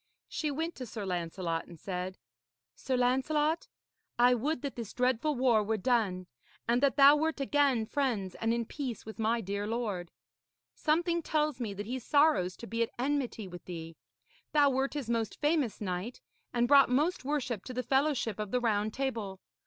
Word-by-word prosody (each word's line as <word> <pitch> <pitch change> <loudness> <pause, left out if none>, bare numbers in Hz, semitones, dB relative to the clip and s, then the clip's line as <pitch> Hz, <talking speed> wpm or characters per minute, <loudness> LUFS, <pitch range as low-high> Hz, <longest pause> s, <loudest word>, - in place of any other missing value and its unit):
She 305 - -2
went 320 +4 -2
to 255 - -6
Sir 215 -2 -5
Lancelot, 170 -2 -2
and 170 -2 -12
said: 185 +1 -4 0.6
'Sir 260 - -2
Lancelot, 295 +6 +1 0.5
I 245 +1 +6
would 250 +3 -1
that 280 - -3
this 230 -4 -6
dreadful 255 +4 +1
war 245 -4 +3
were 220 +1 0
done, 210 -5 +1 0.4
and 240 +2 +3
that 280 -2 +3
thou 280 +1 +8
wert 315 0 0
again 275 -4 +2
friends 220 -8 -1
and 225 - -1
in 235 0 0
peace 255 -4 -5
with 220 +1 -9
my 225 +1 +1
dear 200 +1 -3
lord. 210 -7 -2 0.6
Something 340 +2 +1
tells 305 -2 0
me 215 -5 -3
that 205 +1 -5
he 255 +4 -3
sorrows 255 - +3
to - - -8
be 230 0 -3
at 230 - +1
enmity 255 -5 -1
with 175 -1 -10
thee. 165 -2 -7 0.6
Thou 290 -2 +5
wert 270 +2 0
his 285 -5 -3
most 230 -3 -1
famous 295 -6 +1
knight 190 +4 -4 0.3
and 240 0 +2
brought 275 -1 +7
most 295 +7 +1
worship 260 -7 -2
to 255 - -6
the 250 - -1
fellowship 265 -5 +1
of 210 -1 -3
the 250 - +1
Round 215 -3 +1
Table. 225 -8 -3
245 Hz, 180 wpm, -31 LUFS, 210-280 Hz, 0.6 s, thou